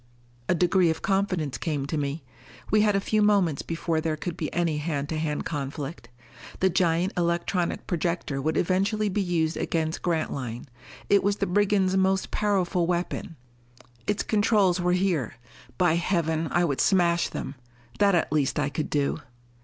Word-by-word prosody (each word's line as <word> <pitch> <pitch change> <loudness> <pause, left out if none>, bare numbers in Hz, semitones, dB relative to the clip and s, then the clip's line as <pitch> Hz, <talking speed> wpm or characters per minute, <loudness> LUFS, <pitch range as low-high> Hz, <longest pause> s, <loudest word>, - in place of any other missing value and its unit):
A - - +4
degree 180 0 +3
of 160 - -2
confidence 185 -8 0
came 145 -4 -2
to 155 - -3
me. 145 +1 -2 0.5
We 215 - +5
had 210 -1 +3
a - - +3
few 215 +2 0
moments 195 -8 +3
before 165 -1 -2
there 155 -1 -1
could 170 +2 -4
be 155 - -4
any 165 -3 0
hand 145 -2 -3
to 160 - -2
hand 150 -2 -2
conflict. 145 -2 -5 0.5
The 190 0 +3
giant 175 +2 +1
electronic 170 +1 -1
projector 170 -5 -2
would 155 +3 0
eventually 200 +4 +1
be 200 +2 0
used 170 -3 0
against 160 -1 -1
Grantline; 140 -8 -2 0.4
it 200 - +4
was 200 +1 +2
the 200 - -1
brigands' 195 0 +2
most 190 0 +1
powerful 185 -4 +1
weapon. 175 -1 -2 0.7
Its 205 - 0
controls 205 -4 +2
were 180 0 +2
here, 180 - 0 0.4
by 175 -3 +3
Heaven, 165 -2 0
I 175 0 +2
would 140 -5 0
smash 170 -3 +3
them? 135 - -5 0.5
That 200 -2 +4
at 160 -3 0
least 145 -2 +1
I 145 -1 +1
could 150 +2 -3
do! 145 +1 0
170 Hz, 165 wpm, -26 LUFS, 155-190 Hz, 0.7 s, We